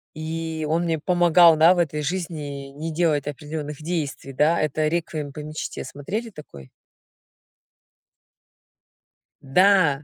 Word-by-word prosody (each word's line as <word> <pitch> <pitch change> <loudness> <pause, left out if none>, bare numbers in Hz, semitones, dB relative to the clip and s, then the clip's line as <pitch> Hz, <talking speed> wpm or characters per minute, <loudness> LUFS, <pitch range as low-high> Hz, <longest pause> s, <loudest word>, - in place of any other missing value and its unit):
И 160 0 -4
он 165 +2 +1
мне 165 -2 -1
помогал, 175 0 +5
да, 160 +3 +6
в - - -4
этой 155 -3 0
жизни 150 -4 -5
не 160 +3 -5
делать 155 -3 0
определённых 150 +1 -6
действий, 150 -4 -4
да. 155 +5 +2
Это 155 +1 0
"Реквием 160 -3 -3
по 145 - -9
мечте". 155 +1 -6
Смотрели 210 +12 -5
такой? 75 - -13 2.7
Да! 160 -1 +3
155 Hz, 120 wpm, -23 LUFS, 145-170 Hz, 2.7 s, да